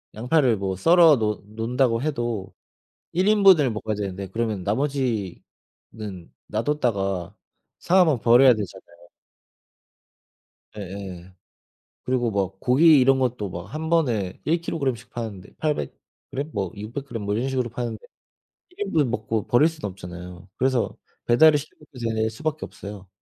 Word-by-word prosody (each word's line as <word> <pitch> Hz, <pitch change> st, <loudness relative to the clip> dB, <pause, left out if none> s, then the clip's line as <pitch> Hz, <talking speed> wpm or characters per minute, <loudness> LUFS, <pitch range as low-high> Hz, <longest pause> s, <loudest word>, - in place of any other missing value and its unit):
양파를 125 Hz, +1 st, +2 dB
뭐 95 Hz, -1 st, -2 dB
썰어 165 Hz, -, +6 dB
놓 105 Hz, -2 st, -2 dB
놓는다고 115 Hz, +2 st, 0 dB
해도 120 Hz, -9 st, -3 dB, 0.6 s
1 185 Hz, +3 st, +1 dB
인분을 195 Hz, -, +6 dB
먹어야 110 Hz, 0 st, -3 dB
되는데 100 Hz, -1 st, -4 dB
그러면 110 Hz, -2 st, -2 dB
나머지는 110 Hz, -5 st, -4 dB
놔뒀다가 105 Hz, -, -1 dB, 0.5 s
상하면 175 Hz, -7 st, +3 dB
버려야 125 Hz, +3 st, +6 dB
되잖아요. 95 Hz, -5 st, -7 dB, 1.8 s
예예. 95 Hz, -2 st, -8 dB, 0.7 s
그리고 125 Hz, -2 st, 0 dB
막 95 Hz, -2 st, -2 dB
고기 150 Hz, +5 st, +6 dB
이런 135 Hz, +1 st, +4 dB
것도 120 Hz, -6 st, -1 dB
막 85 Hz, 0 st, -6 dB
한 160 Hz, +1 st, -4 dB
번에 120 Hz, -, 0 dB
1 165 Hz, +2 st, +1 dB
킬로그램 140 Hz, -6 st, -1 dB
씩 120 Hz, +2 st, -15 dB
파는데 105 Hz, -5 st, -7 dB
800 150 Hz, -2 st, -1 dB, 0.4 s
그램 140 Hz, +3 st, -4 dB
뭐 95 Hz, -4 st, -3 dB
600 115 Hz, +7 st, -6 dB
그램 115 Hz, -5 st, -6 dB
뭐 100 Hz, 0 st, -1 dB
이런 120 Hz, +5 st, -1 dB
식으로 130 Hz, -2 st, -1 dB
파는데 115 Hz, -2 st, -5 dB, 0.7 s
1 390 Hz, +3 st, -5 dB
인분을 150 Hz, -3 st, +2 dB
먹고 110 Hz, -3 st, -2 dB
버릴 135 Hz, +6 st, +5 dB
수는 155 Hz, -9 st, -5 dB
없잖아요. 90 Hz, 0 st, -10 dB
그래서 130 Hz, -2 st, 0 dB, 0.3 s
배달을 150 Hz, +6 st, +6 dB
시켜 145 Hz, +1 st, -8 dB
먹게 150 Hz, -4 st, -15 dB, 0.2 s
될 110 Hz, 0 st, +1 dB
수밖에 155 Hz, +6 st, -4 dB
없어요. 100 Hz, -1 st, -10 dB
115 Hz, 285 characters per minute, -24 LUFS, 100-140 Hz, 1.8 s, 썰어